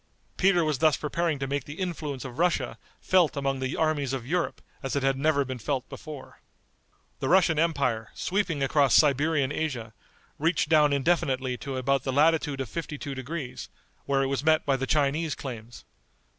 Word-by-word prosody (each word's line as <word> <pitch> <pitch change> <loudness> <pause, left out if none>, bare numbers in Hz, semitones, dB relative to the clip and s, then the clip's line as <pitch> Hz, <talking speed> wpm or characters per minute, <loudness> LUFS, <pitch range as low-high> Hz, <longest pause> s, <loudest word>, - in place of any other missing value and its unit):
Peter 180 -3 +3
was 150 -4 0
thus 155 -1 +4
preparing 160 +1 -1
to 135 - -3
make 140 0 -2
the 145 +4 -9
influence 155 -7 -4
of 130 +1 -8
Russia 175 0 0 0.2
felt 180 -5 +3
among 135 -1 -1
the 130 +1 -2
armies 150 -4 0
of 130 -3 -3
Europe 170 +6 -1 0.2
as 135 -1 -3
it 140 - 0
had 135 0 +2
never 140 0 +2
been 130 -1 -5
felt 130 +3 -2
before. 150 -4 -10 0.8
The 135 - -2
Russian 170 -4 +4
empire, 140 -9 0
sweeping 180 -7 -1
across 140 -2 +3
Siberian 145 -1 +3
Asia, 125 -8 -3 0.5
reached 160 -1 +1
down 150 -2 +5
indefinitely 135 -3 +1
to 135 -1 -5
about 135 +1 +1
the 135 - -2
latitude 150 -1 +2
of 130 - -4
fifty 155 +2 -5
two 140 0 -5
degrees, 135 0 -6 0.4
where 135 -1 +1
it - - 0
was 135 +1 -2
met 155 0 +3
by 140 - +2
the 135 0 -3
Chinese 150 +2 +1
claims. 120 -3 -8
140 Hz, 180 wpm, -27 LUFS, 135-160 Hz, 0.8 s, down